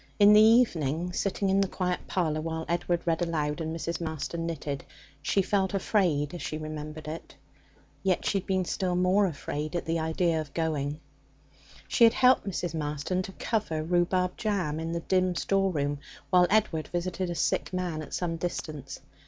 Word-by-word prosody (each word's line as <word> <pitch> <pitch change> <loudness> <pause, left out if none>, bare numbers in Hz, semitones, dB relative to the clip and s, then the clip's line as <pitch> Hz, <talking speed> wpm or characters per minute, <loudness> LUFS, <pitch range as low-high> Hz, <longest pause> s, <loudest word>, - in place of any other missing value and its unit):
In 205 0 +7
the 210 - +8
evening, 180 - +3
sitting 195 +1 0
in 195 +1 +4
the 195 - +2
quiet 180 -1 -1
parlour 155 -4 0
while 160 0 -3
Edward 175 0 0
read 165 0 +1
aloud 155 -2 -1
and 160 0 -2
Mrs. 165 +1 -3
Marston 165 +1 -3
knitted, 145 -4 -4 0.4
she 195 +6 +2
felt 195 0 +1
afraid 175 -7 +1
as 175 - -6
she 155 - -3
remembered 155 0 -6
it. 160 +2 -7 0.7
Yet 190 -2 +1
she 200 - +2
had - - -12
been 185 -1 +1
still 180 0 -1
more 185 +3 +3
afraid 150 -1 -4
at 175 - -2
the 165 0 0
idea 160 0 +1
of 145 -3 -10
going. 150 -3 -1 0.9
She - - +3
had 230 0 +8
helped 255 -3 +4
Mrs. 175 -3 -2
Marston 150 +3 -2
to 190 - -7
cover 195 -10 -1
rhubarb 180 +2 +1
jam 185 -8 -1
in 165 0 -3
the 170 0 -2
dim 185 0 +1
store 195 +2 +1
room 145 -3 -1 0.3
while 180 -1 +6
Edward 195 -8 +2
visited 180 +1 -2
a 175 - -3
sick 160 - 0
man 180 -4 -2
at 150 - -6
some 165 -2 -2
distance. 155 -5 -5
170 Hz, 180 wpm, -28 LUFS, 155-185 Hz, 0.9 s, the